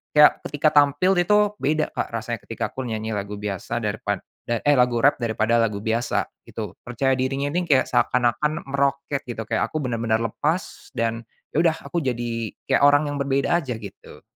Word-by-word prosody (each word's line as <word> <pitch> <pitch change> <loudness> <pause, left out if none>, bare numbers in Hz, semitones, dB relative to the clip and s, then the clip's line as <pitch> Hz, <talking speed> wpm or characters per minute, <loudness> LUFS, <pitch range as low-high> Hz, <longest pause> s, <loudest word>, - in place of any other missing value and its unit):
kayak 150 0 +7
ketika 145 +1 +1
tampil 145 +6 +4
itu 210 +3 +4
beda 155 +3 0
Kak - - -3
rasanya - - -3
ketika - - -3
aku 130 -2 -5
nyanyi 110 0 -3
lagu 105 0 -3
biasa 105 +3 -4
daripad 105 -1 -2 0.2
da 115 -1 0
eh, 145 - +5
lagu 125 -2 +2
rap 145 -1 +4
daripada 115 0 +1
lagu 105 -3 0
biasa 115 +2 0 0.2
gitu. 105 -4 -6
Percaya 130 +3 0
dirinya 135 +2 -1
ini 175 +2 -1
kayak 135 -4 +3
seakan-akan 125 +6 +1
meroket 140 0 0
gitu, 115 -2 -4
kayak 115 +1 0
aku 155 -1 -2
benar-benar 115 -2 0
lepas, 155 - -3
dan 115 0 -1 0.3
ya - - 0
udah 165 -2 +3
aku 175 - -1
jadi 120 -3 -2 0.2
kayak 135 - +4
orang 145 0 +3
yang 145 - -3
berbeda 140 +4 +1
aja, 130 -7 -4
gitu. 105 -3 -11
125 Hz, 180 wpm, -23 LUFS, 115-145 Hz, 0.3 s, kayak